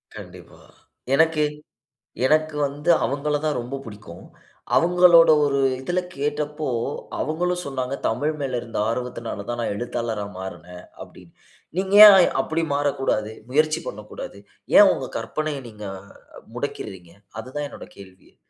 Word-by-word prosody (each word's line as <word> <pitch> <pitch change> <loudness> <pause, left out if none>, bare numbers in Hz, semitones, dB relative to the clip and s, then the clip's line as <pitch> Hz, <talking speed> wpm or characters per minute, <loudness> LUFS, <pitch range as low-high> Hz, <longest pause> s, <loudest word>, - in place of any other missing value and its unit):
கண்டிப்பா. - - -12 0.5
எனக்கு, 160 +1 +3 0.8
எனக்கு 155 +2 +2
வந்து 145 +4 -5 0.2
அவுங்கள 145 +2 -1
தான் 150 - 0
ரொம்ப 125 +3 -6
புடிக்கும். 105 -6 -11 0.5
அவுங்களோட 175 -1 +6 0.2
ஒரு 140 -1 0 0.2
இதில 175 +6 -1 0.2
கேட்டப்போ, 150 +1 -3 0.5
அவுங்களும் 180 +3 -2
சொன்னாங்க, 135 -1 -3
தமிழ் 150 +4 -1
மேல் 135 -3 -2
இருந்த 115 -1 -7
ஆர்வத்தினால 115 -3 -5
தான் 120 0 -3
நான் 110 - -2
எழுத்தாளரா 115 -2 -3
மாறுனேன்.அப்பிடின்னு. 90 -1 -11 0.4
நீங்க 190 +1 0
ஏன் 200 -2 +10 0.2
அப்பிடி 160 +4 -2
மாறக்கூடாது? 135 -7 -1 0.2
முயற்சி 155 +3 +2
பண்ணக்கூடாது. - - -8 0.4
ஏன் - - +9
உங்க - - -5
கற்பனைய 155 -2 -3
நீங்க 105 -1 -12 0.7
முடக்கிறீங்க! 90 -3 -6 0.3
அதுதான் 130 +5 -5
என்னுடைய - - -12
கேள்வியே! 95 -1 -16
140 Hz, 115 wpm, -23 LUFS, 115-155 Hz, 0.8 s, ஏன்